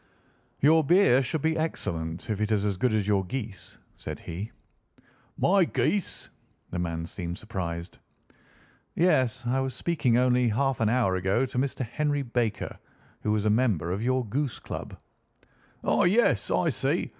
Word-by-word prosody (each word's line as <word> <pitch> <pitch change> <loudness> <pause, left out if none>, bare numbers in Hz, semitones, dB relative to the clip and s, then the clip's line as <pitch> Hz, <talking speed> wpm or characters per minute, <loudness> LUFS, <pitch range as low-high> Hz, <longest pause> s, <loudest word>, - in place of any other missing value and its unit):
"Your 160 +3 +5
beer 170 -4 +5
should 140 +3 -2
be 160 0 +2
excellent 85 - -3
if 105 0 -2
it 105 +1 0
is 105 -1 +2
as 100 -2 0
good 125 +6 +1
as 105 -2 0
your 100 -2 +2
geese," 100 -3 -6 0.2
said - - -6
he. 95 +7 -6 0.9
"My 195 +1 +4
geese!" 195 +2 -1 0.4
The 90 - -3
man 85 -1 -2
seemed 85 0 -5
surprised. 85 -5 -5 1.0
"Yes. 130 -8 +2
I 125 +2 +1
was 135 -1 -2
speaking 140 -9 +1
only 125 0 +3
half 135 +3 0
an 110 -2 +2
hour 115 -6 +2
ago 95 +8 +1
to 125 - -7
Mr. 130 -1 -1
Henry 145 +4 -1
Baker, 115 -4 -2 0.4
who 105 - 0
was 105 -1 0
a 105 - +4
member 105 -8 +1
of 95 +3 -2
your 130 +1 +1
goose 130 +3 -2
club." - - -7 0.9
"Ah! - - +2
yes, 210 +7 +3
I - - +2
see. - - 0
120 Hz, 160 wpm, -27 LUFS, 100-135 Hz, 1.0 s, Your